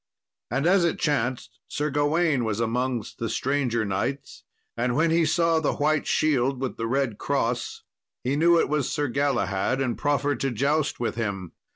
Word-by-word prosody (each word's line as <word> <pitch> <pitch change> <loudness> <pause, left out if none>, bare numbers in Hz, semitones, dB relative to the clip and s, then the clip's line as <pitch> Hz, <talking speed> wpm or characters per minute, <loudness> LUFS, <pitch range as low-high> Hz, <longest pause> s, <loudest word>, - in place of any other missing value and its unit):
And 135 +5 -1
as 185 +1 +4
it 170 - +1
chanced, 130 -5 -1
Sir 150 0 -2
Gawain 145 -1 +1
was 110 -1 -2
amongst 120 0 -2
the 115 - -2
stranger 130 -5 0
knights, 100 +8 -3 0.3
and 120 +1 0
when 160 +3 +2
he 165 -1 +3
saw 165 +1 +2
the 160 - 0
white 150 +1 +1
shield 135 -3 +1
with 130 -1 -3
the 115 - -2
red 130 -3 -1
cross, 125 -4 -2 0.4
he 130 +3 0
knew 170 +3 +4
it - - +2
was 150 -3 -1
Sir 145 0 0
Galahad, 130 -4 0
and 130 -3 0
proffered 145 0 0
to 135 - 0
joust 140 +5 0
with 120 - -1
him. 100 -6 -3
135 Hz, 175 wpm, -25 LUFS, 120-150 Hz, 0.4 s, as